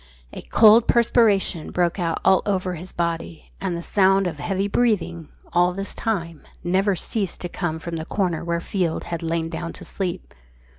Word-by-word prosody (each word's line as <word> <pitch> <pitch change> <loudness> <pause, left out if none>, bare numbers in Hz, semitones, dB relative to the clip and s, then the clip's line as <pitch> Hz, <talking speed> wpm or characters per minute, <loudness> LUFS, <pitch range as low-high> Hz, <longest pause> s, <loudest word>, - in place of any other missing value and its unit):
A - - -7
cold 220 +1 +6
perspiration 220 -8 +3
broke 175 +1 0
out 165 -2 -1
all 190 - +5
over 185 -2 0
his 175 +2 -8
body; 170 -1 -4
and 180 -3 -2
the 170 - -6
sound 195 0 +3
of 160 -4 -3
heavy 195 +6 -1
breathing, 200 -8 0 0.2
all 175 +1 +3
this 195 +2 -4
time, 170 -8 -3 0.2
never 190 +3 +2
ceased 195 +1 -2
to 175 - -3
come 170 -2 -3
from 165 +1 -5
the 160 - -5
corner 180 -5 -1
where 170 0 -1
Field 175 -2 -2
had 170 -1 -5
lain 165 0 -1
down 165 +1 -5
to - - -10
sleep. 185 -3 -4
175 Hz, 180 wpm, -23 LUFS, 170-195 Hz, 0.2 s, cold